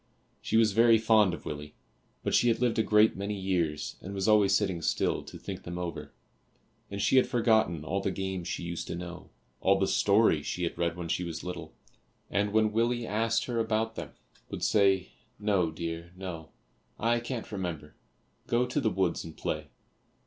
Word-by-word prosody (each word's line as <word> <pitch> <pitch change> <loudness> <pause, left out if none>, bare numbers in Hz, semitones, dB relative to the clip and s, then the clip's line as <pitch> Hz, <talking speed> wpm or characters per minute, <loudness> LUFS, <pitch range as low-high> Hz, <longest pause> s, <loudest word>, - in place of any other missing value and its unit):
She - - +1
was 110 -2 +5
very 115 +2 +6
fond 110 -3 +4
of 85 - -7
Willie, 75 0 -6 0.5
but - - -1
she 120 - +4
had 115 -1 +2
lived 120 -2 +1
a - - +6
great 105 +1 +4
many 100 +2 -3
years 85 -6 -1
and 100 +2 -7
was 95 +1 -1
always 105 -3 +5
sitting 95 -5 0
still - - 0
to - - -10
think - - -7
them 85 0 -6
over, 85 -3 -5 0.8
and 100 - -5
she 110 - +3
had 130 - +5
forgotten 110 - +2
all 95 +4 -1
the 100 - 0
games 95 -2 -3
she - - -3
used 85 0 -4
to - - -4
know, 90 0 -8 0.3
all 95 +1 +3
the 95 - +2
stories 100 -7 +3
she 90 - -2
had 85 - -2
read 85 0 -1
when 85 -1 -4
she 90 - -1
was 85 -2 -5
little, 85 -3 -7 0.6
and 100 +2 +1
when 110 0 +3
Willie 120 +2 +1
asked 115 +2 0
her 120 -2 -2
about 110 0 0
them, - - -6 0.4
would - - -5
say, 95 -3 +3 0.3
"No, 100 -5 +1
dear, 85 +1 -5
no, 85 -4 -7 0.5
I 120 +1 +2
can't 120 -1 -5
remember; 90 -7 -5 0.5
go 120 +1 +2
to 125 +4 -1
the 110 - +2
woods 95 -3 0
and 80 -1 -10
play." - - -3
95 Hz, 190 wpm, -29 LUFS, 85-110 Hz, 0.8 s, very